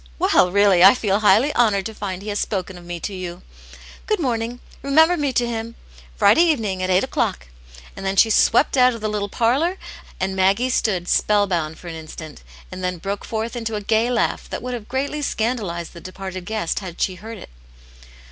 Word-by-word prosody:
Well, 180 Hz, -, +3 dB
really 200 Hz, -2 st, +5 dB
I 195 Hz, +6 st, +9 dB
feel 205 Hz, -5 st, 0 dB
highly 220 Hz, +7 st, +4 dB
honoured 210 Hz, -5 st, +2 dB
to 220 Hz, -, -5 dB
find 195 Hz, -3 st, -5 dB
he 215 Hz, -, -6 dB
has 205 Hz, -, -2 dB
spoken 190 Hz, -2 st, -3 dB
of 175 Hz, -, -12 dB
me 175 Hz, 0 st, -6 dB
to 205 Hz, -, -4 dB
you. 180 Hz, -1 st, -7 dB, 0.6 s
Good 430 Hz, -2 st, +1 dB
morning; 240 Hz, -4 st, -2 dB, 0.2 s
remember 315 Hz, +6 st, +4 dB
me 290 Hz, -4 st, -1 dB
to 245 Hz, -, +2 dB
him; 230 Hz, 0 st, -5 dB, 0.4 s
Friday 195 Hz, -, +5 dB
evening, 225 Hz, -, +1 dB
at 185 Hz, -, -1 dB
eight 185 Hz, +1 st, +3 dB
o'clock." 240 Hz, -, -2 dB, 0.5 s
And -, -, -8 dB
then 195 Hz, 0 st, -1 dB
she 220 Hz, +3 st, +5 dB
swept 240 Hz, +6 st, +3 dB
out 250 Hz, -1 st, +5 dB
of 230 Hz, -, -9 dB
the 215 Hz, -, -1 dB
little 205 Hz, -1 st, -2 dB
parlour, 275 Hz, -, +1 dB, 0.4 s
and 190 Hz, 0 st, -2 dB
Maggie 200 Hz, +7 st, +2 dB
stood 185 Hz, -8 st, 0 dB
spell 205 Hz, +1 st, +3 dB
bound 160 Hz, -4 st, -2 dB
for 175 Hz, -, -12 dB
an 170 Hz, -, -5 dB
instant, 155 Hz, -1 st, -9 dB, 0.3 s
and 185 Hz, 0 st, -7 dB
then 180 Hz, 0 st, -2 dB
broke 195 Hz, +4 st, -4 dB
forth 225 Hz, +2 st, -4 dB
into 225 Hz, -2 st, -3 dB
a 210 Hz, -, -3 dB
gay 220 Hz, +3 st, +1 dB
laugh 245 Hz, -1 st, -1 dB
that -, -, -5 dB
would 250 Hz, 0 st, -4 dB
have 225 Hz, -3 st, -6 dB
greatly 275 Hz, +4 st, -2 dB
scandalized 220 Hz, -, -2 dB
the 170 Hz, -, -11 dB
departed 185 Hz, 0 st, -7 dB
guest, 215 Hz, -5 st, -2 dB
had 185 Hz, -4 st, -9 dB
she 190 Hz, -, 0 dB
heard 220 Hz, +5 st, -9 dB
it. -, -, -12 dB
210 Hz, 205 wpm, -21 LUFS, 185-240 Hz, 0.6 s, I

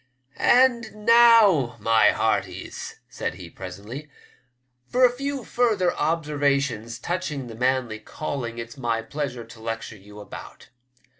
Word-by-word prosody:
"And 235 Hz, -4 st, +3 dB
now, 225 Hz, -, +6 dB
my 110 Hz, +1 st, +4 dB
hearties," -, -, -2 dB
said -, -, -4 dB
he 90 Hz, -2 st, -10 dB
presently, 105 Hz, +11 st, -8 dB, 0.8 s
"for 255 Hz, +1 st, +5 dB
a 245 Hz, -, +4 dB
few 275 Hz, +1 st, -4 dB
further 220 Hz, -7 st, +1 dB
observations 140 Hz, -7 st, 0 dB
touching 170 Hz, -6 st, -3 dB
the 115 Hz, -, -9 dB
manly 125 Hz, -2 st, 0 dB
calling 120 Hz, 0 st, -5 dB
it's 115 Hz, +2 st, -7 dB
my 115 Hz, -3 st, -1 dB
pleasure 135 Hz, -1 st, -4 dB
to 115 Hz, 0 st, -14 dB
lecture 115 Hz, -1 st, -5 dB
you 105 Hz, +1 st, -14 dB
about. 105 Hz, -, -11 dB
135 Hz, 125 wpm, -24 LUFS, 115-185 Hz, 0.8 s, now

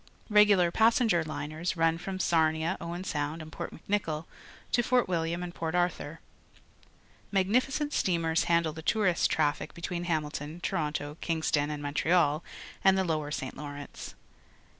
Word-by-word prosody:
Regular 205 Hz, -4 st, +5 dB
passenger 220 Hz, -4 st, +3 dB
liners 155 Hz, +3 st, -4 dB
run 165 Hz, 0 st, +2 dB
from 190 Hz, +1 st, -5 dB
Sarnia, 160 Hz, 0 st, +2 dB
Owen 170 Hz, +2 st, -5 dB
Sound, 150 Hz, -2 st, -2 dB
and 155 Hz, -1 st, -9 dB
Port -, -, -5 dB
Mc -, -, -14 dB
Nicoll 165 Hz, -6 st, -1 dB, 0.5 s
to 240 Hz, -, +4 dB
Fort 245 Hz, +1 st, +2 dB
Wilham 170 Hz, 0 st, -1 dB
and 175 Hz, -1 st, -6 dB
Port 165 Hz, 0 st, -3 dB
Arthur. 175 Hz, -3 st, -1 dB, 1.1 s
Magnificent 255 Hz, +10 st, +1 dB
steamers 165 Hz, -3 st, +1 dB
handle 170 Hz, -2 st, +2 dB
the 160 Hz, -, -8 dB
tourist 185 Hz, -1 st, +2 dB
traffic 150 Hz, 0 st, 0 dB
between 170 Hz, +1 st, -4 dB
Hamilton, 155 Hz, -1 st, -3 dB
Toronto, 150 Hz, -5 st, -2 dB
Ivingston, 160 Hz, -3 st, 0 dB
and 150 Hz, -1 st, -4 dB
Montreal 150 Hz, +1 st, +2 dB, 0.4 s
and 190 Hz, 0 st, +5 dB
the 190 Hz, -, +2 dB
Lower 155 Hz, -4 st, -1 dB
St. 130 Hz, -2 st, -4 dB
Lawrence. 145 Hz, 0 st, -8 dB
165 Hz, 140 wpm, -29 LUFS, 155-185 Hz, 1.1 s, Regular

